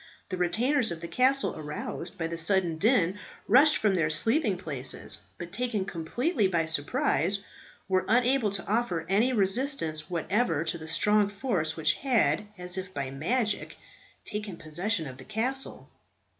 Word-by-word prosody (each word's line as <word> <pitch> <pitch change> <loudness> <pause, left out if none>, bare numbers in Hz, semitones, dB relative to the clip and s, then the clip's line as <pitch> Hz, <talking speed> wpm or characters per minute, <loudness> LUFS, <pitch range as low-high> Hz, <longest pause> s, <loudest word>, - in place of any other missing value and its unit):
The 185 - -3
retainers 235 +9 +1
of 170 -1 -5
the 170 - -6
castle, 265 +6 +2
aroused 155 +3 -6
by 165 - -2
the 165 +1 -3
sudden 170 -2 +3
din, 205 -3 +2 0.3
rushed 290 +7 +6
from 210 -2 +2
their 165 -5 +1
sleeping 215 - +2
places, 140 -8 -1 0.2
but 175 0 -8
taken 220 -2 -1
completely 210 - -1
by 170 -3 0
surprise, 160 +4 0 0.4
were 185 -1 +1
unable 245 0 +3
to 200 0 -3
offer 200 -7 0
any 215 +7 +3
resistance 195 - 0
whatever 175 -1 0
to 165 +1 -3
the 160 - -9
strong 210 +5 +3
force 195 - -2
which 155 -1 +3
had, 210 - +2
as 180 +1 -1
if 185 0 -7
by 140 -2 -3
magic, 210 - -1 0.5
taken 210 -4 -5
possession 170 +4 -1
of 130 -2 -8
the 130 - -11
castle. 250 +5 -3
190 Hz, 155 wpm, -28 LUFS, 165-230 Hz, 0.5 s, rushed